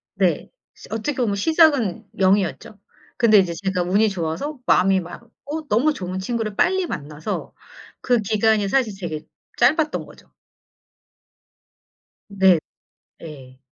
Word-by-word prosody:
네. - - 0 0.2
시 - - -15
어떻게 225 +6 -2
보면 230 -6 0
시작은 285 - +2
0 190 +1 +5
이었죠. 200 +2 -5 0.4
근데 225 -3 +5
이제 185 -3 +2
제가 185 +1 -2
운이 200 +5 +2
좋아서 190 - -4
마음이 190 +1 +4
맞고 275 - -9
너무 270 +8 +2
좋은 185 -5 -5
친구를 215 +1 -3
빨리 375 - +2
만나서 150 - -5 0.5
그 245 -2 +2
기간이 215 0 +1
사실 240 -2 +1
되게 160 -5 -5 0.3
짧았던 305 +5 +2
거죠. - - -18 2.0
네. 190 -4 +4 0.6
예. 135 -5 -11
205 Hz, 245 characters per minute, -22 LUFS, 180-245 Hz, 2.0 s, 0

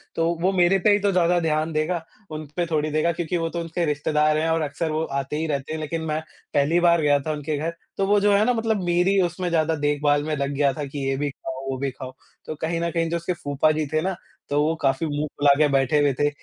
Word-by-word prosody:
तो 165 0 +1
वो 190 +2 +3
मेरे 180 +2 +4
पे 205 +3 +4
ही 205 - +4
तो 200 0 +1
ज़्यादा 175 -1 +3
ध्यान 155 0 0
देगा, 160 +3 0 0.3
उन 155 0 -5
पे 175 - +1
थोड़ी 155 -2 -1
देगा 155 +3 +2
क्योंकि 175 +1 -2
वो 165 0 -1
तो 170 - -4
उसके 165 +1 -2
रिश्तेदार 150 +1 +1
हैं 160 +1 0
और 165 0 +1
अक्सर 155 +2 -2
वो 155 +1 -1
आते 140 0 -3
ही 160 - -1
रहते 145 0 -3
हैं। 160 - -3
लेक़िन 160 +2 -3
मैं 155 0 -2 0.3
पहली 145 +5 +3
बार 170 -1 +4
गया 145 -1 +3
था 155 +3 -3
उनके 150 0 -3
घर 165 +3 -2 0.2
तो 195 - +1
वो 205 0 +4
जो 205 0 +3
है 200 +1 +4
ना 250 - +3
मतलब 225 -4 0
मेरी 180 +3 +2
उसमें 175 +1 -1
ज़्यादा 160 -1 +1
देखभाल 145 0 +1
में 155 0 -2
लग 140 0 -2
गया 140 -1 +3
था 150 -2 -4
कि 140 +1 -7
ये 135 - 0
भी 145 0 -1
ख़ाओ, 130 -1 -7
वो 130 - -3
भी 135 +1 -2
ख़ाओ। 130 0 -9 0.3
तो 155 - -5
कहीं 165 +1 -1
न 170 - 0
कहीं 165 -1 0
जो 170 - 0
उसके 170 +2 -2
फूपा 145 -3 0
जी 155 0 -1
थे 155 - +2
ना, 190 +1 -1 0.3
तो 145 +1 +2
वो 155 +2 +2
काफ़ी 135 -1 0
मुँह 145 +1 -2
फुला 145 0 +5
के 150 -1 +4
बैठे 135 +2 +2
हुए 145 -1 +3
थे 145 +3 +1
155 Hz, 270 wpm, -23 LUFS, 145-170 Hz, 0.3 s, फुला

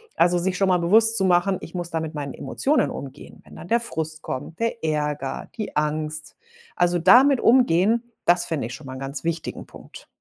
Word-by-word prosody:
Also, 175 +1 +3
sich 185 +1 -1
schon 195 - +2
mal 180 - +3
bewusst 225 +6 +4
zu 190 - +1
machen: 185 +1 +2
„Ich 165 - -10
muss 175 -1 -3
da 165 -2 -2
mit 160 0 -5
meinen 145 -3 -5
Emotionen 295 +3 0
umgehen. 140 +1 -10
Wenn - - -16
dann 170 - -10
der 235 +1 +3
Frust 160 -8 -5
kommt, 160 +6 -6
der 230 0 -2
Ärger, 150 -3 -2
die 215 -3 -6
Angst.“ 155 0 -2 0.4
Also, 175 0 +2
damit 250 - +6
umgehen, 230 -2 +3 0.2
das 175 0 +3
finde 150 -9 -3
ich 125 - -8
schon 145 - -13
mal 130 - -7
'n 130 - -8
ganz 135 0 -5
wichtigen 165 -1 -4
Punkt. - - -14
170 Hz, 205 wpm, -23 LUFS, 150-195 Hz, 0.4 s, damit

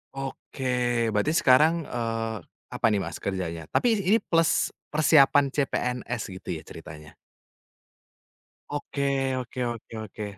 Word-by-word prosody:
Oke, 125 -3 -1
berarti 105 +9 +1
sekarang, 155 +5 +5
eee, 115 -3 -3 0.4
apa - - -2
nih 105 -2 +1
Mas 85 -2 -6
kerjanya? 85 -5 -4
Tapi 230 -4 +2
ini 200 +4 +3
plus 165 -1 +2 0.2
persiapan 145 -2 +4
CPNS 125 -4 -1
gitu 95 - -10
ya 80 - -8
ceritanya? 75 0 -11 1.5
Oke 145 -1 -3 0.4
oke 125 0 -7
oke 115 -1 -10
oke, 105 0 -8
125 Hz, 115 wpm, -26 LUFS, 105-145 Hz, 1.5 s, sekarang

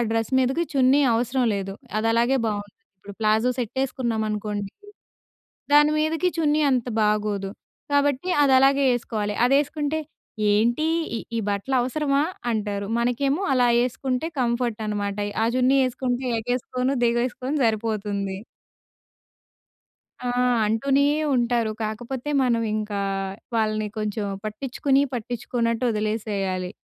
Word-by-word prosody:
Dress 225 +2 -1
మీదకి 265 +7 +1
చున్నీ 270 0 +4
అవసరం 245 +2 0
లేదు. 195 -1 -3 0.3
అది 220 - 0
అలాగే 240 +3 +3
బావుంటుంది. 205 -1 -3 0.3
ఇప్పుడు 200 +2 -11
ప్లాజో 220 +2 +3
సెట్ 240 -1 -3
యేసుకున్నామనుకోండి, 215 -5 -2 1.0
దాని 295 +1 +6
మీదకి 320 +3 +1
చున్నీ 305 -1 +2
అంత 255 -3 +1 0.2
బాగోదు. 210 -2 0 0.4
కాబట్టి 285 +3 +1
అదలాగే 275 0 +5
యేసుకోవాలి. 215 -3 -2
అదేసుకుంటే, 290 +3 +1 0.5
"ఏంటి? 235 +8 +2 0.3
ఈ - - -3 0.2
ఈ - - +1
బట్టలవసరమా" 265 +7 0 0.3
అంటారు. 205 -2 -2
మనకేమో 270 +7 0
అలా 245 -1 +4
యేసుకుంటే 255 +3 -1
కంఫర్ట్ 235 -2 0
అనమాట. 205 -1 -2
ఎయ్ 205 - -8
ఆ - - +2
చున్నీ 255 +2 +4
యేసుకుంటే 255 0 -2
ఎగేసుకొను, 250 +3 -1
దిగేసుకొను 250 +4 0
సరిపోతుంది. 210 -3 -1 1.9
ఆ! - - 0 0.4
అంటూనే 270 +6 +2 0.3
ఉంటారు. 235 -2 +1
కాకపోతే 240 +5 -4
మనం 235 -2 +2
ఇంకా, 210 -2 -2 0.5
వాళ్ళని 215 -1 0
కొంచెం 215 0 -2 0.2
పట్టిచ్చుకుని, 270 +5 0
పట్టించుకోన్నట్టు 235 0 -2
వదిలేసేయాలి. 205 -4 -2
235 Hz, 110 wpm, -24 LUFS, 215-265 Hz, 1.9 s, దాని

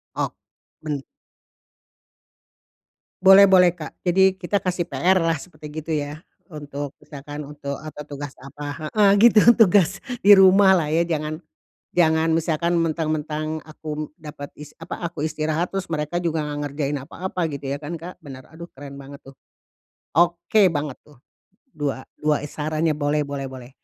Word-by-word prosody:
Ok - - -2 0.5
ben 150 -3 -3 2.2
Boleh 195 +1 +8
boleh, 180 -2 +6
Kak. 155 -3 -8
Jadi 190 +1 +4
kita 195 +2 -1
kasih 180 -2 -1
PR 185 +2 +2
lah, 165 -1 +1
seperti, 155 0 -10 0.2
gitu 165 - -6
ya? 150 +1 -3 0.2
Untuk 145 -3 -7
misalkan 145 0 -8
untuk, 140 -1 -6
apa, 155 -1 -9
tugas, 145 -1 -7
apa 145 +3 -7
heeh, 205 +3 +3
gitu, 230 0 +7
tugas, 195 -3 +4 0.2
di 205 - +7
rumah 190 +1 +7
lah, 170 -5 +3
ya. 160 +2 +2
Jangan 155 0 -3 0.5
jangan 160 -1 +3
misalkan 165 +1 0
mentang-mentang 155 -1 -2
aku 155 -1 -6
dapat 145 -2 -9
is 150 0 -11
apa, 165 - -6
aku 165 -3 -6
istirahat, 155 +2 -1
terus 195 -1 -3
mereka 155 +1 -2
juga 165 -3 -1
nggak 150 -1 -4
ngerjain 145 0 -2
apa-apa, 180 +7 -6
gitu 140 -1 -5
ya, 140 - -2
kan, 150 +3 -6
Kak? 170 +2 -8
Benar, 135 -6 -12
aduh 170 +2 -10
keren 140 0 -10
banget 140 +1 -11
tuh. 135 - -14 0.8
Oke 175 +5 +3
banget 150 -4 -4
tuh, 150 - -21 0.6
dua 140 -3 -3
dua 150 -1 0
sarannya 155 +2 -1
boleh 145 0 0
boleh 140 -1 -4
boleh. 130 -2 -10
155 Hz, 150 wpm, -23 LUFS, 145-175 Hz, 2.2 s, Boleh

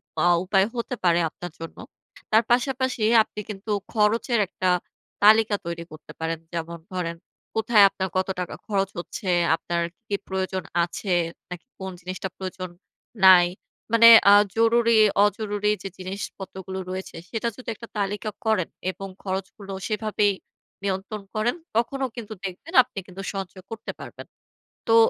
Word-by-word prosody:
পা 160 - +1 0.2
উপায় 190 +1 +3
হতে 240 +1 -3
পারে 175 -1 +4
আপনার 175 +2 -8
জন্য। 165 0 -8 0.5
তার 220 +2 +5
পাশাপাশি 255 -1 +1 0.2
আপনি 210 - -10
কিন্তু 210 +1 -5 0.2
খরচের 225 +2 +2
একটা 185 0 -1 0.5
তালিকা 215 0 +6
তৈরি 170 0 -4
করতে 155 0 -12
পারেন। 165 0 -2
যেমন 170 0 -4
ধরেন 170 -2 -3 0.4
কোথায় 220 -1 +5
আপনার 190 -1 -3
কত 185 - +1
টাকা 180 - -4
খরচ 195 -3 0
হচ্ছে, 185 +2 -5 0.3
আপনার 170 +1 -2 0.3
কি 205 - 0
প্রয়োজন 190 -1 -2 0.2
আছে, 180 +2 -2 0.4
নাকি 180 -2 -7
কোন 190 0 -5
জিনিসটা 185 +1 -5
প্রয়োজন 185 -1 -5 0.6
নাই, 180 -2 +9 0.5
মানে 230 0 +8 0.2
আ - - +9 0.2
জরুরি-অজরুরি 215 -2 +3
যে 195 - -4
জিনিসপত্রগুলো 190 0 -6
রয়েছে। 185 +1 -6
সেটা 230 0 -2
যদি 255 - -7
একটা 230 +2 -10
তালিকা 205 +2 -2 0.2
করেন 215 -6 +1 0.2
এবং 195 +1 -8 0.2
খরচগুলো 195 +1 -5
সেভাবেই 215 -1 +1 0.5
নিয়ন্ত্রণ 200 +2 -3
করেন। 215 +5 +1 0.2
তখনও 265 +3 0
কিন্তু 225 -3 -6
দেখবেন 195 - -7
আপনি 250 -4 -21
কিন্তু 190 +1 -8
সঞ্চয় 190 -1 -6
করতে 225 - -5
পারবেন। - - -9 0.6
তো 225 - +5
195 Hz, 140 wpm, -25 LUFS, 185-220 Hz, 0.6 s, নাই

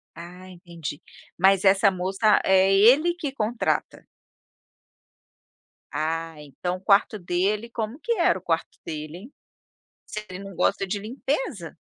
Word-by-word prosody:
Ah 180 +2 -11
entendi, 170 -5 -8 0.4
mas 190 +1 +4
essa 195 +1 +5
moça 190 +3 +2
é 190 0 +4
ele 260 - +5
que 330 -5 -5
contrata. 230 -2 -2 1.9
Ah, 165 +1 -2
então 150 +5 -5
o - - -18
quarto 200 +2 +3
dele 195 +6 -1
como 230 +4 -5
que 470 - -1
era - - +2
o - - -24
quarto - - -2
dele, 155 0 -6
hein, 230 +10 -13 0.7
se 215 - -6
ele 180 0 -7
não 195 -1 -10
gosta 195 +2 +1
de 200 +2 -3
limpeza? 240 - -4
195 Hz, 135 wpm, -24 LUFS, 175-215 Hz, 1.9 s, essa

